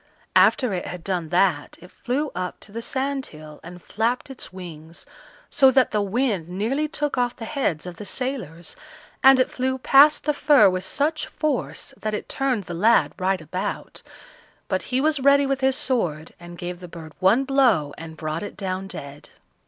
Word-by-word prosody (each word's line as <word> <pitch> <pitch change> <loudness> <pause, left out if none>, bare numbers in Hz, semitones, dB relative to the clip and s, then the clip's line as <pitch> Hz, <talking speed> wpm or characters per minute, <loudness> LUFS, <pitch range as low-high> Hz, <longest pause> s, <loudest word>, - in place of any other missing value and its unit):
After 250 -7 +4
it 180 - -3
had 180 -2 -7
done 175 -4 -2
that, 175 -4 +1
it 180 +1 -15
flew 280 +4 -2
up 180 0 -4
to 200 - -12
the 230 +2 -5
sandhill 260 - -4
and 175 +1 -10
flapped 240 +5 -2
its 265 - -9
wings, 165 -3 -10 0.4
so 265 - +5
that 260 -1 +3
the 210 - +1
wind 200 -4 -1
nearly 230 +12 -1
took 295 -3 -2
off 245 -1 0
the 225 - -7
heads 220 - -2
of 180 -2 -8
the - - -7
sailors, 215 - -5 0.5
and 270 0 +7
it 255 - +2
flew 260 +1 -1
past 275 +3 +5
the 300 - +1
fir 290 -8 +5
with 185 0 -3
such 300 +9 -1
force 300 -5 -3
that 215 0 -2
it - - -6
turned 260 -6 -1
the 175 - -7
lad 215 +7 +3
right 185 -1 0
about, 180 +4 -5 0.7
but - - -1
he 255 - +1
was 305 +1 +1
ready 280 +1 +5
with 270 0 -1
his 265 0 +3
sword, 170 - -1
and 175 0 -11
gave 175 0 -6
the 180 - -9
bird 160 -2 -11
one 200 +8 +4
blow 250 - +2
and 160 0 -10
brought 155 +1 -3
it 205 - -7
down 190 -1 -3
dead. 140 -5 -9
210 Hz, 185 wpm, -23 LUFS, 175-265 Hz, 0.7 s, and